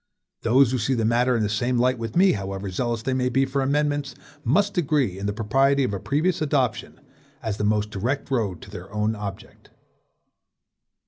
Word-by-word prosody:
Those 125 +2 +4
who 130 - 0
see 130 +4 0
the 115 -2 0
matter 120 +2 +2
in 110 - 0
the - - +1
same 120 +4 0
light 125 0 +2
with 115 0 -5
me, 190 +2 +5
however 95 -1 -4
zealous 115 +3 -2
they 130 - -1
may 125 -1 +1
be 135 +2 +2
for 135 +1 -1
amendments, 145 +1 0 0.3
must 200 - +2
agree 140 - +1
in 100 - -3
the - - 0
propriety 135 +6 +2
of 125 - -1
a 100 - -2
previous 155 - 0
adoption, 140 -6 -1 0.4
as 110 -2 -2
the - - -2
most 105 0 +1
direct 125 +8 -2
road 105 -9 -1
to 100 - -12
their 95 -1 -9
own 105 +1 0
object. 100 -2 -8
120 Hz, 195 wpm, -24 LUFS, 105-135 Hz, 0.4 s, me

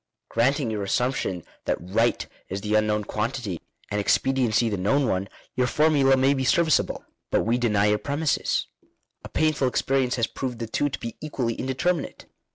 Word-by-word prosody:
Granting 125 +1 +1
your 105 -1 -2
assumption 100 -4 -1 0.2
that - - +1
right 110 +7 +1 0.2
is 95 +1 -4
the 105 +1 -2
unknown 105 0 +2
quantity 105 -4 -3 0.3
and 105 - 0
expediency 120 0 +2
the 105 - 0
known 125 +9 +2
one, 95 -1 -1 0.3
your 125 -1 +2
formula 140 -3 +4
may 135 +2 +4
be 135 -1 -1
serviceable. 160 +4 +2 0.2
But - - +2
we 120 +2 +1
deny 105 -4 +2
your 105 0 +2
premises; 145 +2 0 0.6
a - - -8
painful 155 -4 +1
experience 130 0 +1
has 115 - +1
proved 125 0 -5
ihe 110 - -7
two 145 - +1
to - - -4
be 115 - -6
equally 130 -6 -2
indeterminate. 140 +7 -2
125 Hz, 165 wpm, -25 LUFS, 105-135 Hz, 0.6 s, formula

